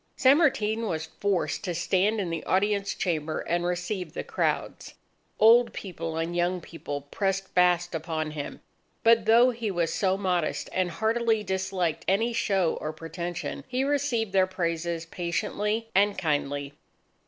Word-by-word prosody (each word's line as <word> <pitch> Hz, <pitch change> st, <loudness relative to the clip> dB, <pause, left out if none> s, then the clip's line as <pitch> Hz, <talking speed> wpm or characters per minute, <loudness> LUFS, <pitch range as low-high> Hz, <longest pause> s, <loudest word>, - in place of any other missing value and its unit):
San 270 Hz, +4 st, +5 dB
Martin 230 Hz, -8 st, +1 dB
was 160 Hz, -4 st, -2 dB
forced 200 Hz, +1 st, 0 dB
to 180 Hz, -4 st, -2 dB
stand 190 Hz, +5 st, +1 dB
in 180 Hz, -4 st, -2 dB
the 165 Hz, -, -3 dB
audience 200 Hz, +1 st, +1 dB
chamber 160 Hz, -3 st, -1 dB
and 175 Hz, 0 st, -1 dB
receive 180 Hz, +2 st, -3 dB
the -, -, -4 dB
crowds. -, -, -2 dB, 0.4 s
Old 235 Hz, +2 st, +6 dB
people 165 Hz, -4 st, -5 dB
and 165 Hz, +1 st, -2 dB
young 175 Hz, +1 st, +1 dB
people 145 Hz, -4 st, -6 dB
pressed 195 Hz, +6 st, -2 dB
fast 175 Hz, -1 st, +2 dB
upon 160 Hz, -1 st, -3 dB
him. 150 Hz, -2 st, -6 dB, 0.4 s
But 230 Hz, 0 st, +5 dB
though 240 Hz, +3 st, +6 dB
he 230 Hz, -2 st, -3 dB
was 175 Hz, -4 st, 0 dB
so 190 Hz, -1 st, +1 dB
modest 180 Hz, -4 st, -1 dB
and 185 Hz, -1 st, +1 dB
heartily 220 Hz, +3 st, +1 dB
disliked 190 Hz, -4 st, -1 dB
any 225 Hz, +5 st, +2 dB
show 195 Hz, -6 st, +1 dB
or 155 Hz, -, -3 dB
pretension, 170 Hz, +2 st, -5 dB
he 255 Hz, +1 st, -1 dB
received 270 Hz, -7 st, 0 dB
their 190 Hz, -1 st, +4 dB
praises 170 Hz, -2 st, -2 dB
patiently 210 Hz, +6 st, -2 dB
and 200 Hz, +1 st, +3 dB
kindly. 145 Hz, -4 st, -1 dB
185 Hz, 150 wpm, -27 LUFS, 170-215 Hz, 0.4 s, Old